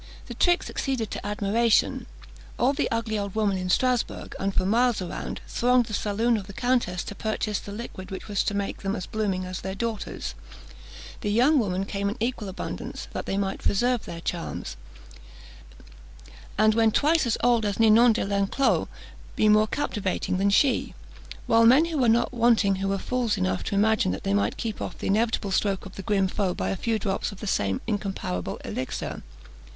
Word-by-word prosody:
The - - -7
trick 350 0 +2
succeeded 255 -6 -3
to - - -5
admiration. 210 +3 +1 0.5
All 260 +3 +3
the - - -1
ugly 225 -2 -1
old 200 -1 -4
women 210 -3 +1
in 185 0 -3
Strasbourg, 250 +5 0
and 195 +1 0
for 185 - 0
miles 235 +3 +2
around, 180 -2 -5
thronged 250 0 +2
the 215 - -8
saloon 220 +3 +1
of 195 -3 -6
the 200 - -9
countess 240 -7 0
to - - -7
purchase 215 -1 -2
the 200 - -9
liquid 205 -3 -7
which 190 - -7
was 205 -2 0
to 205 - -1
make 200 -1 -2
them 195 +1 -1
as 185 - -4
blooming 195 -4 -2
as 185 0 -5
their 190 +1 -4
daughters; 215 - -4 0.9
the 210 - -2
young 265 +7 +4
women 195 -4 -1
came 200 0 -2
in 210 - -5
equal 230 -3 -2
abundance, 190 - -6
that - - -4
they 195 - -1
might 195 -1 -2
preserve 240 +3 +1
their 165 0 -7
charms, 170 - -4 1.8
and 215 +1 +5
when 225 0 +4
twice 300 +4 +2
as 225 - +1
old 240 -2 +4
as 205 0 -2
Ninon 225 +1 +6
de 220 - -1
l'Enclos, 200 +7 +1 0.5
be 215 - +3
more 215 +1 +5
captivating 205 -8 -2
than 200 +1 +3
she; 255 +7 +2 0.5
while 230 0 +4
men 260 +8 +6 0.2
were 240 - +4
not 235 +2 +2
wanting 230 -5 +3
who 195 +1 -2
were 195 0 0
fools 240 0 -1
enough 185 -1 -1
to 205 - -2
imagine 215 - +3
that 95 - -6
they 100 - 0
might 100 +1 +1
keep 220 -2 -4
off - - -5
the - - -7
inevitable 215 0 +1
stroke 195 0 0
of 190 - -10
the - - -6
grim 195 0 +1
foe 190 -1 -1
by - - -2
a - - -1
few 225 +3 -1
drops 195 -1 -2
of 200 - -11
the - - -6
same 100 - 0
incomparable 195 - -3
elixir. - - -4
210 Hz, 190 wpm, -26 LUFS, 195-230 Hz, 1.8 s, Ninon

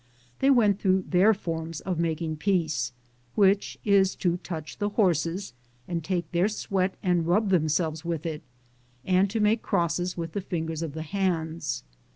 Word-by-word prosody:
They 270 - +3
went 215 -7 +4
through 190 -1 +2
their 190 +4 +5
forma 165 -5 -3
of 180 -3 -1
making 160 -1 -1
peace, 155 -8 0 0.4
which 200 -1 +3
is 195 -2 +4
to 175 -1 0
touch 160 -3 -7
the 205 0 0
horses 180 - 0 0.3
and 170 -2 -3
take 175 -1 -2
their 175 +3 +3
sweat 195 -3 -1
and 175 -3 +2
rub 200 +4 +2
themselves 160 -2 +1
with 170 -2 -3
it, 155 -2 -3 0.6
and 185 +1 +3
to 225 +3 -2
make 215 +2 +3
crosses 175 +2 0
with 165 -1 -4
the 200 - -3
fingers 165 -4 -3
of 160 -4 -4
the 160 - -4
hands. 170 -2 -2
175 Hz, 165 wpm, -27 LUFS, 160-195 Hz, 0.6 s, their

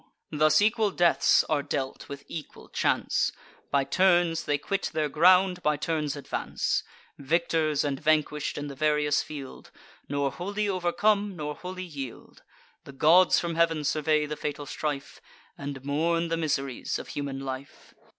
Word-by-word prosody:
Thus 155 +5 +4
equal 220 0 +2
deaths 175 -3 +4
are 150 -2 +1
dealt 135 -1 -4
with 140 0 -8
equal 155 -4 -9
chance; - - +1 0.4
By 140 -1 +2
turns 175 +2 +2
they 145 - +1
quit 195 +7 -2
their 155 -1 0
ground, 180 +3 +4
by 150 -2 +1
turns 150 -1 -2
advance: 145 - -2 0.4
Victors 155 0 +1
and 140 -2 -2
vanquish'd, 150 -1 +1
in 145 - -4
the 145 - -6
various 150 +1 +2
field, 140 -3 -9 0.4
Nor 140 -1 0
wholly 205 +6 -3
overcome, 200 +2 +1
nor 150 -2 -4
wholly 185 +3 -7
yield. 140 -8 -8 0.4
The 140 - -11
gods 165 +6 +5
from 170 -1 -3
heav'n 165 -2 +2
survey 150 +1 +1
the 150 +1 -4
fatal 145 -1 -4
strife, 145 -1 -4 0.3
And 140 -2 -7
mourn 165 +4 0
the 165 - +1
miseries 140 -5 -2
of - - -9
human 140 -2 -4
life. 135 +1 -8
155 Hz, 150 wpm, -27 LUFS, 145-175 Hz, 0.4 s, gods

